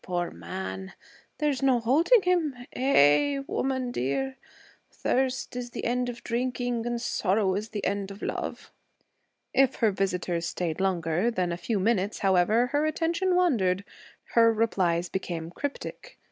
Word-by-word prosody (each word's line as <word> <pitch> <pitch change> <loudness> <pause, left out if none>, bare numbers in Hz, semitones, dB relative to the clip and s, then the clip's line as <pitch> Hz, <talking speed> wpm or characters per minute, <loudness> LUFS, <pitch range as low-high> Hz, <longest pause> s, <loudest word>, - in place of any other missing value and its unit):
Poor 175 -1 -2
man! 95 +3 -6 0.4
There's 295 -3 0
no 265 -3 +4
holding 325 - +4
him? 345 -6 +1 0.2
Eh, 265 - +4
woman 260 -2 -1
dear! 260 - -2 0.5
Thirst 260 -1 -1
is 245 -1 -4
the - - -6
end 245 +1 0
of 240 -1 -8
drinking 245 -1 -1
and 240 0 -1
sorrow 200 -4 +1
is 210 +3 -3
the 205 -3 -4
end 200 -1 -1
of 200 +1 -10
love.' - - -4 0.8
If 270 -1 +4
her 225 -3 +2
visitors 180 -3 -1
stayed 170 0 -3
longer 180 +1 +1
than 185 -7 -1
a - - -1
few 200 +5 -2
minutes, 205 0 +1
however, 195 +5 +4
her 295 +2 +2
attention 335 +4 0
wandered; 200 - +2 0.5
her 230 -1 +6
replies 185 -6 +1
became 170 -3 -4
cryptic. 285 - -6
225 Hz, 145 wpm, -27 LUFS, 180-260 Hz, 0.8 s, her